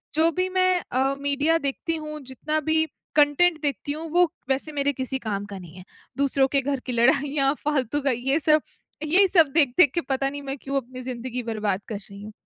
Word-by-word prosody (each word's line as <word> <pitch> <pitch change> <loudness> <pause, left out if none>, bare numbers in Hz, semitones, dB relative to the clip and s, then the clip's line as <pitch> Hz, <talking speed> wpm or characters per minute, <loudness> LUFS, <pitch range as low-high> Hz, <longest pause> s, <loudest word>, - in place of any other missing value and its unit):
जो 320 +2 +4
भी 370 0 +1
मैं 370 -1 +2
अ, 265 +2 +1
मीडिया 285 +3 +1
देखती 325 +2 -2
हूँ, 305 -1 -6
जितना 275 +4 -3
भी 315 0 +3 0.3
कंटेंट 310 +3 +4
देखती 285 0 -2
हूँ, 315 +2 -5
वो 350 -1 +3 0.2
वैसे 270 +4 -1
मेरे 285 -1 0
किसी 260 +1 -3
काम 205 -4 -4
का 200 -1 -8
नहीं 175 -2 -13
है। 185 - -10 0.3
दूसरों 275 -1 +2
के 275 -1 +3
घर 275 0 -2
की 255 - -3
लड़ाइयाँ, 275 +3 +2
फालतू 290 -2 0
का 275 -1 +1
ये 265 +5 +1
सब, 305 -1 +3 0.4
यही 360 +6 +5
सब 340 -5 +5
देख-देख 290 -1 +5
के 340 - 0
पता 270 0 -1
नहीं 285 0 -7
मैं 275 0 -5
क्यों 275 +1 -3
अपनी 255 +1 -10
ज़िंदगी 250 -1 -5
बर्बाद 210 -4 -2
कर 215 - -3
रही 200 0 -11
हूँ। 215 - -9
275 Hz, 205 wpm, -24 LUFS, 255-310 Hz, 0.4 s, यही